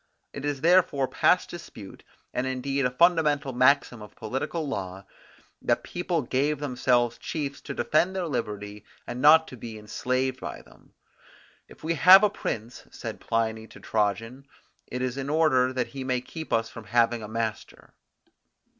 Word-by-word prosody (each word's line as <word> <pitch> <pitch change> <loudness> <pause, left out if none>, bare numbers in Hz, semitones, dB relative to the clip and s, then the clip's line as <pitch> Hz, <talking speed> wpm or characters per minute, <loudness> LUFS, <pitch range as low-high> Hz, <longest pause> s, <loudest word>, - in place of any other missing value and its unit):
It 140 0 -6
is 145 -2 -2
therefore 165 -5 +3
past 180 - +2
dispute, 115 - -10 0.3
and 125 +1 -1
indeed 130 +1 -1
a - - -3
fundamental 150 -2 +2
maxim 130 -2 +3
of 105 - -12
political 135 +8 -3
law, 95 -6 -5 0.6
that - - +1
people 175 -3 -2
gave 140 +5 0
themselves 125 -4 +1
chiefs 140 -3 -4
to 140 - -7
defend 155 +9 +1
their 185 -2 -1
liberty 105 -7 -4 0.2
and 120 +1 -5
not 160 +3 +7
be 110 -1 -7
enslaved 130 +5 -2
by - - -7
them. - - -22 0.7
If - - -17
we 165 +1 0
have 185 +5 +8
a 210 - +4
prince, 115 - -5
said - - -7
Pliny 110 -1 -2
to - - -14
Trajan, 115 +5 -2 0.4
it 125 0 -4
is 130 0 -2
in 135 0 -4
order 145 -5 +3
that 130 -1 -2
he 135 -2 -6
may 130 -1 0
keep 160 +6 -9
us 115 0 +1
from 115 -1 -11
having 115 +2 +2
a 105 - -7
master. 110 0 -5
130 Hz, 160 wpm, -26 LUFS, 115-150 Hz, 0.7 s, have